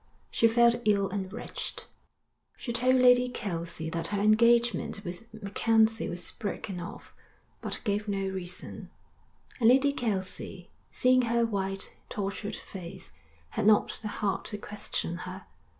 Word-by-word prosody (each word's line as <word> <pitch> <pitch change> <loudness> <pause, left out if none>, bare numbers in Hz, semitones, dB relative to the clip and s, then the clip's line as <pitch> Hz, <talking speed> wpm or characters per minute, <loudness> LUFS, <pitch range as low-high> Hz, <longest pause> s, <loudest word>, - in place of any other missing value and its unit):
She 230 - +4
felt 235 +1 +5
ill 200 -3 +3
and 190 -1 -3
wretched. 235 +4 -5 0.7
She 235 - -4
told 255 +2 +3
Lady 250 0 +6
Kelsey 170 -8 -3
that 165 0 -2
her 205 - -1
engagement 230 0 +3
with 180 +6 -7
MacKenzie 220 +1 +2
was 175 0 -2
broken 200 -3 -4
off, 175 - -9 0.5
but - - -4
gave 210 0 0
no 195 -1 -1
reason; 180 -2 -6 0.7
and 230 -2 +6
Lady 270 +3 +5
Kelsey, 190 -6 -4 0.2
seeing 255 0 +4
her 235 0 +3
white, 195 -3 -3
tortured 205 +1 -3
face, 175 -3 -9 0.4
had 205 - 0
not 215 -1 +4
the 215 - -4
heart 205 -2 -2
to 210 - -4
question 205 -4 -3
her. 185 +2 -7
210 Hz, 135 wpm, -29 LUFS, 190-235 Hz, 0.7 s, Lady